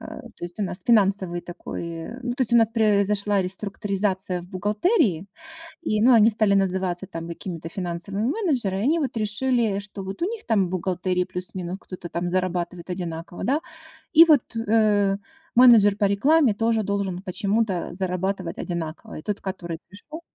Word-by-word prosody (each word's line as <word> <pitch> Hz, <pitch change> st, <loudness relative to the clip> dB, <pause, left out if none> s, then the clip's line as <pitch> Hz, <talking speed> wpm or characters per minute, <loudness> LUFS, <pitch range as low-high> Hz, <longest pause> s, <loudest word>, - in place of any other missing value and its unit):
Э, -, -, -9 dB, 0.3 s
то -, -, -6 dB
есть 175 Hz, +2 st, -6 dB
у -, -, +1 dB
нас 185 Hz, -1 st, +1 dB
финансовый 195 Hz, -5 st, +3 dB
такой 170 Hz, -1 st, -7 dB
ну, 245 Hz, -1 st, -2 dB
то 250 Hz, -, -10 dB
есть 240 Hz, -, +3 dB
у -, -, +8 dB
нас 225 Hz, -2 st, +4 dB
произошла 205 Hz, -2 st, +2 dB
реструктуризация 195 Hz, -1 st, -1 dB
в 175 Hz, -, -14 dB
бухгалтерии. 205 Hz, -, +1 dB, 0.6 s
И, 215 Hz, -9 st, 0 dB
ну, 250 Hz, +3 st, +6 dB
они 225 Hz, -1 st, +6 dB
стали 215 Hz, -2 st, +2 dB
называться 190 Hz, -1 st, +1 dB
там 165 Hz, -1 st, -7 dB
какими-то 170 Hz, -1 st, -6 dB
финансовыми 190 Hz, +5 st, -3 dB
менеджеры, 265 Hz, -, 0 dB
они 305 Hz, +8 st, +2 dB
вот 270 Hz, -6 st, -3 dB
решили, 220 Hz, -1 st, +1 dB
что 200 Hz, -1 st, -8 dB
вот 195 Hz, -, -7 dB
у -, -, +2 dB
них 445 Hz, +2 st, -5 dB
там 205 Hz, -5 st, +2 dB
в -, -, -6 dB
бухгалтерии 180 Hz, 0 st, -1 dB
плюс-минус 180 Hz, 0 st, -5 dB
кто-то 180 Hz, -2 st, -9 dB
там 175 Hz, +1 st, -2 dB
зарабатывает 180 Hz, -1 st, -2 dB
одинаково, 175 Hz, -1 st, -5 dB
да, 280 Hz, +5 st, +1 dB, 0.5 s
и 330 Hz, 0 st, +9 dB
вот, 290 Hz, -7 st, +2 dB
э, 210 Hz, -3 st, +2 dB, 0.4 s
менеджер 230 Hz, -5 st, +7 dB
по 205 Hz, -, 0 dB
рекламе 265 Hz, +7 st, +3 dB
тоже 225 Hz, +1 st, +1 dB
должен 200 Hz, -3 st, -2 dB
почему-то 200 Hz, 0 st, -1 dB
зарабатывать 185 Hz, -1 st, -3 dB
одинаково. 165 Hz, -2 st, -5 dB
И -, -, -17 dB
тот, 205 Hz, +3 st, -3 dB
который 175 Hz, -3 st, -5 dB
пришел 205 Hz, -, -10 dB
200 Hz, 165 wpm, -24 LUFS, 180-220 Hz, 0.6 s, и